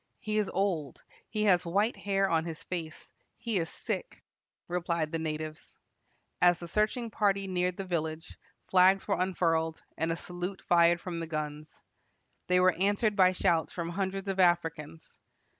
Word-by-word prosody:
"He 215 0 -1
is 210 - 0
old; 175 -9 -2 0.3
he 215 -1 -1
has 180 -4 +4
white 200 +7 +1
hair 195 -1 0
on 165 -3 +1
his 165 -2 -7
face; 165 -3 -6 0.3
he 225 -5 -1
is 165 0 -2
sick," - - -5 0.4
replied 170 -3 -1
the 165 - -2
natives. 155 0 -5 0.6
As 175 -1 +5
the 170 - -8
searching 215 +5 0
party 200 -2 +1
neared 180 -1 -1
the 195 - -3
village, 160 -2 -4 0.3
flags 190 +1 +4
were 200 - 0
unfurled, 165 -3 0
and 160 +1 -1
a - - 0
salute 180 +3 -6
fired 170 0 +5
from 170 -1 -5
the 165 - -4
guns. 155 -1 -6 0.6
They 180 0 +4
were 185 0 +5
answered 205 +2 +2
by 185 -2 +5
shouts 170 -3 +1
from 170 -1 -3
hundreds 195 +2 -3
of 195 -1 -2
Africans. 165 -3 0
180 Hz, 160 wpm, -30 LUFS, 165-195 Hz, 0.6 s, As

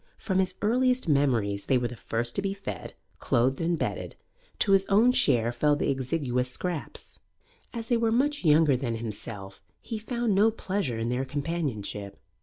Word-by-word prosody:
From 190 -2 -1
his 185 -1 0
earliest 250 +2 +2
memories 120 -9 +1
they 135 - +4
were 120 -1 0
the 125 - -8
first 120 +1 -3
to - - 0
be 195 0 -2
fed, 200 - -7 0.2
clothed 130 +5 +1
and 170 +1 +1
bedded; - - -3 0.4
to 200 - +2
his 195 -1 +5
own 220 +5 +5
share 120 - +3
fell 145 +4 +2
the 145 - 0
exiguous 130 -2 -1
scraps. 170 +4 -5 0.5
As 230 -2 -6
they 240 - +3
were 230 -1 +1
much 285 +4 +1
younger 155 -3 +5
than 120 -3 -2
himself, 105 -3 -7 0.2
he 225 -2 -5
found 235 -1 -1
no 205 +3 +5
pleasure 195 - -2
in 115 +1 -2
their 125 +2 0
companionship. 130 -9 -4
150 Hz, 175 wpm, -27 LUFS, 120-200 Hz, 0.5 s, his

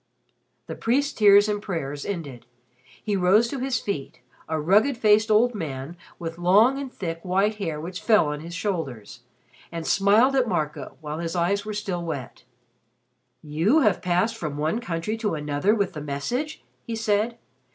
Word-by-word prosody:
The - - -6
priest's 280 +5 0
tears 205 -1 +6
and 205 -1 -1
prayers 145 -8 -4
ended. 140 -11 -6 0.6
He 210 - -1
rose 195 +5 +4
to 275 - -4
his 255 -1 -1
feet 150 -10 -5 0.3
a 160 -1 -1
rugged 210 - +3
faced 215 -1 +4
old 230 +3 +4
man 150 -5 -5 0.2
with 165 -1 -6
long 210 +10 +4
and 275 -2 -6
thick 165 -6 -5
white 195 +4 +1
hair 165 -7 -3
which 175 +3 -6
fell 215 -7 +4
on 150 0 -4
his 170 +2 -8
shoulders 150 - -4 0.5
and 165 -1 -5
smiled 215 +10 +4
at 255 -2 +2
Marco 150 -8 -3
while 150 0 -5
his 165 0 -3
eyes 200 +4 0
were 215 -1 -4
still 195 -5 -3
wet. 140 -7 -6 1.0
"You 165 - +2
have 210 -8 +2
passed 180 +5 +1
from 155 -9 -5
one 155 +9 0
country 180 +1 -3
to 210 -6 -1
another 150 +7 +1
with 200 -4 -1
the 150 - -6
message?" 235 - -3 0.2
he 230 - -5
said. 220 +1 0
190 Hz, 170 wpm, -25 LUFS, 160-220 Hz, 1.0 s, tears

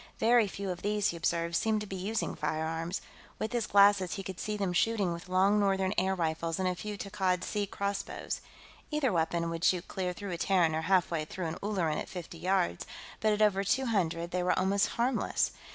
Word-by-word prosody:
Very 230 -1 +4
few 195 0 -4
of 180 0 -6
these, 205 0 +1
he - - -3
observed, 170 0 0
seemed 220 +3 +2
to - - -4
be 195 - -6
using 200 +4 -2
firearms; 160 +3 -2 0.4
with 220 +2 -3
his 235 -3 0
glasses, 200 -2 +5
he 195 - -5
could 190 -1 -7
see 210 0 -2
them 195 -3 -1
shooting 200 -1 +2
with 170 +2 -8
long 195 +3 +4
northern 195 -1 +2
air 190 +1 +1
rifles 165 -1 -1
and 190 -1 0
a 180 - +1
few 205 +3 -6
Takkad 190 -2 -1
Sea 205 -1 -2
crossbows. 200 +1 -3 0.5
Either 300 - +1
weapon 170 0 0
would 165 0 -4
shoot 180 0 +2
clear 185 -2 -2
through 195 +2 -6
a 170 - -4
Terran 175 -5 +3
or 160 - 0
half 185 0 +2
way 160 -2 0
through 175 +3 -5
an 160 +1 -3
Ulleran 185 -7 0
at - - -6
fifty 170 -2 -8
yards, 175 - 0 0.3
but 215 +1 +2
at 210 +1 +3
over 200 -2 +3
two 260 +7 +1
hundred 175 -6 0
they 180 - 0
were 180 - +1
almost 195 +2 +2
harmless. 240 +1 +1
190 Hz, 215 wpm, -30 LUFS, 170-205 Hz, 0.5 s, glasses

